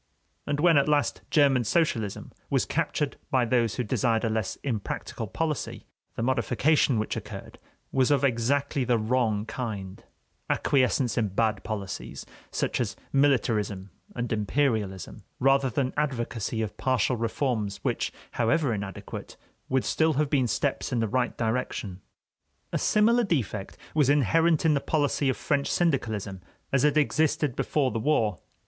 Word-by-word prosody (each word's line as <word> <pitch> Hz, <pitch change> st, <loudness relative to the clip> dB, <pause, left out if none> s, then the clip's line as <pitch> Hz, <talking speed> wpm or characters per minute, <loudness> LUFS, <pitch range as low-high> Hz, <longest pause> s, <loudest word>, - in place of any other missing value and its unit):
And 145 Hz, 0 st, -1 dB
when, 165 Hz, -1 st, +5 dB
at 140 Hz, -, +1 dB
last, 145 Hz, -1 st, +1 dB
German 140 Hz, -6 st, +4 dB
socialism 115 Hz, -, 0 dB, 0.2 s
was -, -, +2 dB
captured 145 Hz, -2 st, -1 dB
by 130 Hz, -2 st, +2 dB
those 115 Hz, -3 st, +1 dB
who 125 Hz, -, -1 dB
desired 115 Hz, +1 st, +1 dB
a 115 Hz, -, 0 dB
less 110 Hz, -3 st, -1 dB
impracticable 115 Hz, -2 st, -3 dB
policy, 155 Hz, +6 st, -3 dB, 0.3 s
the 115 Hz, -, -2 dB
modification 130 Hz, +2 st, +2 dB
which 110 Hz, -, -1 dB
occurred -, -, -8 dB, 0.3 s
was 130 Hz, -1 st, +2 dB
of 145 Hz, -2 st, +3 dB
exactly 140 Hz, +2 st, +1 dB
the 120 Hz, -1 st, +2 dB
wrong 110 Hz, -2 st, 0 dB
kind: 100 Hz, -6 st, -5 dB, 0.5 s
acquiescence 130 Hz, -2 st, +2 dB
in 110 Hz, -, +1 dB
bad 105 Hz, 0 st, 0 dB
policies, 100 Hz, -4 st, -5 dB, 0.2 s
such -, -, -1 dB
as 100 Hz, -6 st, -2 dB, 0.2 s
militarism 110 Hz, -8 st, +1 dB, 0.2 s
and 120 Hz, -1 st, -2 dB
imperialism, 105 Hz, -, -1 dB, 0.2 s
rather 135 Hz, 0 st, +3 dB
than 130 Hz, +2 st, -1 dB
advocacy 120 Hz, -6 st, -2 dB
of 105 Hz, -, -6 dB
partial 130 Hz, -1 st, +1 dB
reforms 115 Hz, -3 st, -1 dB
which, -, -, -1 dB, 0.2 s
however 120 Hz, +3 st, +1 dB
inadequate, 100 Hz, -2 st, -6 dB, 0.3 s
would 130 Hz, -1 st, +1 dB
still 160 Hz, 0 st, +2 dB
have 150 Hz, 0 st, 0 dB
been 135 Hz, -4 st, +3 dB
steps 140 Hz, +4 st, -1 dB
in 125 Hz, -, 0 dB
the 115 Hz, -, +1 dB
right 125 Hz, +2 st, -1 dB
direction. 110 Hz, -5 st, -2 dB, 0.7 s
A -, -, +1 dB
similar 230 Hz, +3 st, +3 dB
defect 125 Hz, -, -2 dB, 0.2 s
was 150 Hz, -4 st, +3 dB
inherent 160 Hz, +4 st, +3 dB
in 160 Hz, -, +5 dB
the 140 Hz, -, +1 dB
policy 145 Hz, -2 st, +1 dB
of 130 Hz, -, 0 dB
French 140 Hz, -1 st, 0 dB
syndicalism 110 Hz, -, -1 dB, 0.3 s
as 135 Hz, -, +3 dB
it 150 Hz, 0 st, +3 dB
existed 150 Hz, -2 st, +1 dB
before 140 Hz, -4 st, 0 dB
the 115 Hz, -, -2 dB
war. 110 Hz, -, +1 dB
125 Hz, 145 wpm, -27 LUFS, 110-145 Hz, 0.7 s, when